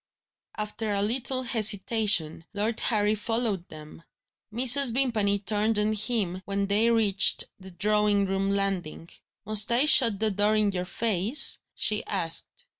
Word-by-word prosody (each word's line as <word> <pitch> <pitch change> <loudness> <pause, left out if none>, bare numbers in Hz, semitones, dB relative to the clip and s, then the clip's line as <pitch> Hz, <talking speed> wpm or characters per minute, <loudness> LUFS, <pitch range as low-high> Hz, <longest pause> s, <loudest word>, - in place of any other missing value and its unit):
After 210 0 -4
a 200 - -1
little 255 +4 -2
hesitation, 210 -8 +1
Lord 215 +3 -2
Harry 210 -2 0
followed 215 -4 -3
them. 155 +1 -13 0.5
Mrs. 255 +3 +4
Vimpany 220 -7 0
turned 210 +2 -2
on 210 +1 0
him 210 -4 -3
when 200 0 -3
they 210 +4 +1
reached 215 -4 +3 0.2
the 190 0 -13
drawing 205 +2 0
room 195 0 -2
landing. 195 -5 -3 0.4
"Must 215 +1 +1
I 245 +5 +4
shut 230 -9 +4
the 220 0 0
door 205 +2 0
in 210 -1 0
your 180 -1 -5
face?" 215 +5 +3 0.2
she 210 0 0
asked. 165 -5 -2
210 Hz, 140 wpm, -25 LUFS, 195-225 Hz, 0.5 s, Mrs